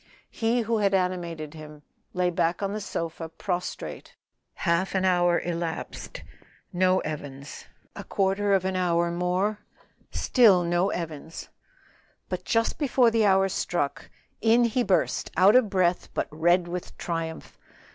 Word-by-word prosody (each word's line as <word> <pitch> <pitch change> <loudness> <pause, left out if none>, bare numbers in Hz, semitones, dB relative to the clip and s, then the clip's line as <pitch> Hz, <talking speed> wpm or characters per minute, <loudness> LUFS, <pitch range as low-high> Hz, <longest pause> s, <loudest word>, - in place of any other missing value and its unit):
He 230 +2 0
who 225 0 0
had 200 -1 +2
animated 170 -5 -2
him 150 -1 -11 0.3
lay 180 -1 0
back 170 +2 0
on 200 0 -1
the 215 - -4
sofa 165 -4 -5
prostrated. 180 +2 -5 0.4
Half 180 +2 0
an 190 0 +1
hour 175 -1 +3
elapsed, 170 - -5 0.5
no 185 +1 +3
Evans; 145 -2 -7 0.3
a - - -7
quarter 195 +1 +1
of 190 -1 0
an 190 0 -1
hour 170 -2 +1
more, 180 +4 0 0.5
still 210 -8 +4
no 175 +2 +1
Evans; 160 -1 -6 0.8
but - - -4
just 230 +5 0
before 255 -5 +3
the 220 -2 +3
hour 195 0 +4
struck, 175 -5 -2 0.3
in 230 +2 +4
he 235 +2 +1
burst 195 - 0
out 195 +5 +6
of 250 -5 +5
breath 180 -2 +1
but - - -1
red 175 +3 +2
with 175 0 -6
triumph. 165 -1 -5
180 Hz, 140 wpm, -26 LUFS, 170-200 Hz, 0.8 s, out